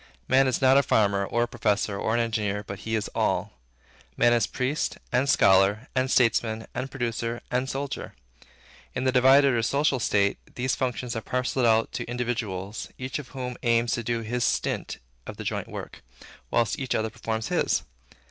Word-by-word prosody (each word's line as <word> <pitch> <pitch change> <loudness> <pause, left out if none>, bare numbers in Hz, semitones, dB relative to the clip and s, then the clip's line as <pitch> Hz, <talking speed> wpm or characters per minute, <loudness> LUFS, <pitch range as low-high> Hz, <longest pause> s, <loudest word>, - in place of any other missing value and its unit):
Man 135 +1 +4
is 130 +1 0
not 130 +1 +6
a - - +5
farmer, 100 -6 +2
or 120 - +1
a - - -1
professor, 105 -3 0
or 110 +3 -1
an - - +2
engineer, 105 -3 -1
but 100 -1 -7
he 110 0 -2
is 110 - -1
all. - - 0 0.6
Man 120 - +5
is 115 -4 +2
priest, 135 +4 -2
and 125 +3 +2
scholar, 100 +4 +4
and 130 0 +1
statesman, 115 -2 +2
and 130 +2 -3
producer, 120 -2 -3
and 125 +1 0
soldier. 140 +1 -4 0.8
In 130 - -1
the 130 - +2
divided 135 +2 +6
or 115 - +2
social 140 +3 +1
state, 100 -3 +1 0.2
these 125 +1 0
functions 125 -1 -2
are 115 - -2
parceled 125 +1 0
out 110 0 +3
to - - -4
individuals, 115 -5 -3
each 130 +3 -4
of 145 - -8
whom 125 -2 -6
aims 115 0 +2
to 125 -2 0
do 115 0 -2
his 120 +2 -2
stint - - -1 0.3
of - - -7
the - - -6
joint - - -3
work, - - -8 0.5
whilst 115 -4 +1
each 130 -3 -1
other 110 0 -1
performs 110 -1 -3
his. - - +1
120 Hz, 185 wpm, -26 LUFS, 110-130 Hz, 0.8 s, not